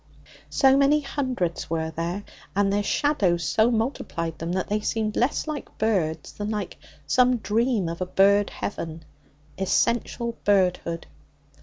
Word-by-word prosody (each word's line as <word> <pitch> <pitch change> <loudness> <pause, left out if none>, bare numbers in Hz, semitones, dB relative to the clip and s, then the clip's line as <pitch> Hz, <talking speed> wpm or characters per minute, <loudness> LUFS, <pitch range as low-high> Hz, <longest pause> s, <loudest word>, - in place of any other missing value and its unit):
So 270 -1 +5
many 280 +2 +4
hundreds 255 - -2
were 160 0 -1
there, 170 +5 -3 0.3
and 200 0 +2
their 205 - +2
shadows 200 - +1
so 220 - +3
multiplied 220 - -2
them, 165 +1 -3
that 185 0 -1
they 210 +1 0
seemed 215 0 -1
less 245 +4 +1
like 305 -2 -6
birds 170 -8 0
than 205 0 -5
like 210 -4 -4 0.3
some 250 - +4
dream 220 -1 +1
of 170 +2 -5
a 185 - -1
bird 200 +2 +4
heaven 160 -5 -5 0.5
essential 235 +4 0
birdhood. 180 -4 +1
205 Hz, 140 wpm, -25 LUFS, 170-235 Hz, 0.5 s, So